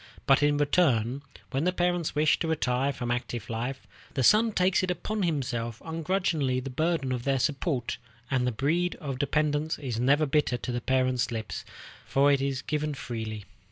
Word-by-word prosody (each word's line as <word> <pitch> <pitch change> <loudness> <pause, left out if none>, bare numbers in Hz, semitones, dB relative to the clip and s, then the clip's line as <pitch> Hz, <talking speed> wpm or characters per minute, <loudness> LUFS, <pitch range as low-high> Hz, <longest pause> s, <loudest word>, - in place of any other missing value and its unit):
But 135 0 +5
in 145 0 +3
return, 140 -5 +2 0.3
when 135 +3 0
the 180 - +3
parents 175 -3 0
wish 150 0 +3
to 165 - -1
retire 135 -3 +1
from 120 -2 -4
active 120 -2 -3
life, 120 +4 -4 0.3
the 130 - +1
son 220 - +5
takes 185 -1 +2
upon 185 +4 -2
himself 125 - -1
ungrudgingly 160 -5 0
the 130 +1 -6
burden 155 -1 0
of 125 -2 -2
their 135 0 +1
support, 135 -1 -1 0.3
and 125 -2 +2
the - - +1
bread 160 +9 0
of 140 -6 -5
dependence 150 +2 0
is 125 -6 -4
never 140 +5 +3
bitter 140 -3 +1
to 125 - -5
the 120 0 -2
parents' 130 -1 +1
lips, 110 -3 -4 0.4
for 140 +1 +3
it 140 -1 +2
is 135 -1 -1
given 150 -1 -2
freely. 110 -4 -5
140 Hz, 175 wpm, -28 LUFS, 125-155 Hz, 0.4 s, But